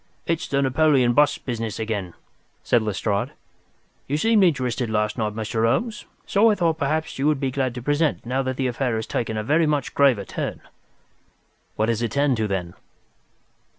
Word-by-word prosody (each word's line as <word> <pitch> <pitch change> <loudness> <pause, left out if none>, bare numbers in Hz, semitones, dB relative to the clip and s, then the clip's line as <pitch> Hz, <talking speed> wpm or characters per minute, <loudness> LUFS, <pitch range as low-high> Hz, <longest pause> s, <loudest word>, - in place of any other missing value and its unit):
"It's 165 -1 -1
the 140 0 +1
Napoleon 135 -2 +3
bust 145 +2 +2
business 115 -4 -3
again," 105 -6 -3 0.5
said 120 - +3
Lestrade. 105 -1 -1 0.7
"You 145 - 0
seemed 220 +4 +4
interested 130 -7 +1
last 105 0 0
night, 105 -3 -2
Mr. 110 0 -2
Holmes, 210 - 0 0.2
so 215 +3 +4
I 215 - +3
thought 165 -4 0
perhaps 155 0 -1
you 140 - +2
would 150 -3 +2
be 135 -2 -1
glad 130 -2 -1
to 125 - -5
be - - -17
present 145 -1 +1
now 130 +3 0
that 130 -1 -3
the 135 - -1
affair 125 -1 -1
has 110 0 -2
taken 110 -2 -2
a 105 - -2
very 155 +7 +2
much 145 -3 -1
graver 130 -8 +3
turn." - - -4 1.1
"What 110 - 0
has 115 -1 0
it 115 -2 -2
turned 140 -3 +2
to, 110 -1 0
then?" 90 -3 -3
130 Hz, 185 wpm, -23 LUFS, 110-145 Hz, 1.1 s, seemed